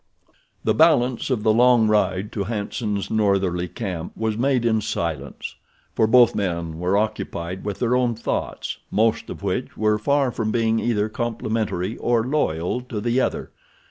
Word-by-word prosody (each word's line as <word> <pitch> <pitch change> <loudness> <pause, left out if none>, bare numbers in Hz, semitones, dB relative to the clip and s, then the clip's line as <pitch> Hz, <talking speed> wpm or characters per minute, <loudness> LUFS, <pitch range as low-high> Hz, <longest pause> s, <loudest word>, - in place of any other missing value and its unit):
The - - +2
balance 135 -7 +3
of 120 -5 0
the 110 - +4
long 120 -1 +5
ride 105 -1 +1
to 100 -2 -3
Hanson's 105 -1 -3
northerly 95 -4 +1
camp 90 -6 -5
was 110 -1 -1
made 125 0 +1
in 110 -2 +2
silence, 85 -5 -4 0.4
for 110 - +2
both 120 0 +6
men 85 -4 -3
were 90 +3 +1
occupied 95 -4 -3
with 100 -2 -3
their 125 0 +1
own 125 -2 +1
thoughts, 115 - -3
most 110 +1 +1
of - - -8
which - - -3
were 105 0 +2
far 140 +3 +1
from 110 -2 -2
being 115 0 +1
either 110 -3 0
complimentary 110 -4 -2
or 120 -2 +1
loyal 125 - -1
to 125 -4 -5
the 120 +4 +1
other. - - -2
110 Hz, 160 wpm, -23 LUFS, 100-120 Hz, 0.4 s, both